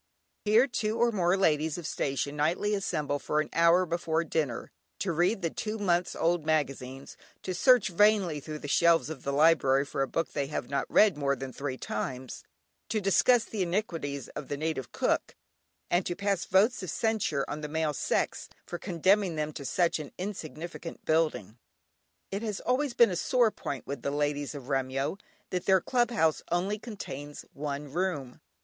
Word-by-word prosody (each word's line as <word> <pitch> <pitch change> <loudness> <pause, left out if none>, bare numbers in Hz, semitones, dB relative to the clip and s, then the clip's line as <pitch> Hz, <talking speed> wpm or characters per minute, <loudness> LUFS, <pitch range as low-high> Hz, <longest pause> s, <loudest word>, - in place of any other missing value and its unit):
Here 220 +4 +5
two 225 -4 -2
or 235 0 +3
more 185 -3 +2
ladies 160 -4 +2
of 175 - -6
the - - -2
station 140 +1 -2
nightly 170 +8 +1
assemble 155 -8 -1
for 150 - 0
an 155 - -1
hour 170 +2 +5
before 165 -1 0
dinner, 150 -6 -2 0.3
to 190 - -1
read 180 +5 +1
the 165 - 0
two 215 0 -4
months 180 -4 +1
old 170 -1 +1
magazines, 135 -4 -2 0.3
to 185 - -3
search 245 +4 +5
vainly 190 -4 +3
through 155 +2 -6
the 145 - -7
shelves 165 +2 +3
of 145 -5 -7
the 140 - -2
"library" 140 -2 +4
for 140 - -3
a 135 - +1
book 165 +3 -2
they 140 -1 -1
have 135 -4 -4
not 140 -1 -1
read 205 -7 +5
more 140 -1 +1
than 135 0 -7
three 140 -2 -4
times, 130 +3 -5 0.5
to 215 - +1
discuss 215 +5 +4
the 215 - -4
iniquities 170 - -2
of - - -7
the 145 - -3
native 155 -4 -3
cook, - - 0 0.6
and 175 +2 +3
to 175 - -2
pass 200 -2 -1
votes 205 +5 +3
of 185 - -5
censure 215 -11 0
on 150 - -5
the 150 - -4
male 155 0 -1
sex - - -1 0.2
for 175 - -6
condemning 185 0 +2
them 155 0 -2
to 140 - -7
such 165 +5 +1
an 150 - -7
insignificant 175 -3 -6
building. 155 - 0 0.7
It 195 +1 -2
has 215 -4 -3
always 255 0 0
been 235 -4 +6
a - - -1
sore 235 +5 +3
point 140 -9 -5
with 140 - -5
the - - -1
ladies 145 0 -1
of 135 -3 -8
Remyo 135 +5 -1 0.3
that 180 -1 -2
their 190 -1 +6
Club 240 +3 +1
House 160 -10 +2
only 190 +5 0
contains 145 - -7
one 145 0 -5
room. 165 -8 -2
165 Hz, 185 wpm, -29 LUFS, 145-195 Hz, 0.7 s, been